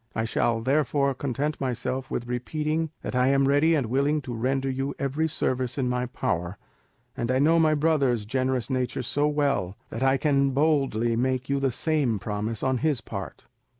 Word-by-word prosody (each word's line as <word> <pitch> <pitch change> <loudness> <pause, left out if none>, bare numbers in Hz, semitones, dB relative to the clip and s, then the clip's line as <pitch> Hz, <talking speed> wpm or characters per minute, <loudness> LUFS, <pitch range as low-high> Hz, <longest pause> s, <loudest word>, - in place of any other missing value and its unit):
I 110 - 0
shall 115 0 0
therefore 140 +1 +1
content 140 +3 -3
myself 130 0 -2
with 120 - -3
repeating 155 +6 -2
that - - -4
I 125 0 +3
am 135 0 +3
ready 145 +4 +4
and 140 -5 +1
willing 140 +6 +1
to 125 -2 -5
render 135 +4 -1
you 135 +1 -2
every 145 +3 0
service 130 -4 -1
in 130 -2 0
my 125 0 -1
power, 90 -5 -2 0.6
and 120 -3 -3
I 130 - +2
know 160 +5 +4
my 155 -1 +4
brother's 140 -8 +1
generous 130 +1 -1
nature 130 -2 -2
so 145 +4 +1
well, 140 -11 0
that 115 - -5
I 135 0 +3
can 140 -1 +2
boldly 135 -6 +2
make 130 +2 -1
you 140 0 +1
the 135 -1 +1
same 135 -2 0
promise 105 +2 -3
on 130 -1 +1
his 150 -3 +1
part. - - -7
130 Hz, 185 wpm, -26 LUFS, 125-145 Hz, 0.6 s, ready